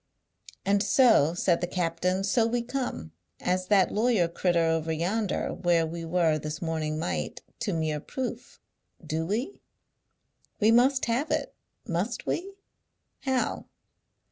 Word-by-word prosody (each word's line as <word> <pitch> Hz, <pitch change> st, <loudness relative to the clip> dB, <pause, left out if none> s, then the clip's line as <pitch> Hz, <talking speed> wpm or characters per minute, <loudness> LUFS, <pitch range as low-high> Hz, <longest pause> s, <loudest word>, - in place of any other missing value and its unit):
"And 200 Hz, +1 st, +3 dB
so," 205 Hz, -, +4 dB
said 175 Hz, -1 st, +2 dB
the 175 Hz, -, 0 dB
captain, 180 Hz, +2 st, -1 dB
"so 225 Hz, +3 st, +2 dB
we 235 Hz, +1 st, -1 dB
come 245 Hz, -, -4 dB, 0.3 s
as 185 Hz, 0 st, -1 dB
that 195 Hz, -3 st, +4 dB
lawyer 215 Hz, -5 st, +2 dB
crittur 170 Hz, 0 st, +1 dB
over 165 Hz, 0 st, 0 dB
yonder 185 Hz, +6 st, -1 dB
where 170 Hz, -2 st, +2 dB
we 165 Hz, +1 st, -5 dB
were 165 Hz, -2 st, +2 dB
this 150 Hz, +1 st, -5 dB
morning 160 Hz, -2 st, -2 dB
might 85 Hz, -, -3 dB, 0.2 s
to -, -, -1 dB
mere 155 Hz, -2 st, -1 dB
proof; 245 Hz, -, -6 dB, 0.5 s
do 160 Hz, +1 st, -2 dB
we? 240 Hz, -, -3 dB, 1.0 s
We 215 Hz, +1 st, +5 dB
must 255 Hz, +3 st, +4 dB
have 245 Hz, +7 st, 0 dB
it; -, -, -1 dB, 0.3 s
must 185 Hz, +8 st, -2 dB
we? 390 Hz, +3 st, -3 dB, 0.6 s
How? 265 Hz, -2 st, -1 dB
180 Hz, 135 wpm, -27 LUFS, 165-230 Hz, 1.0 s, We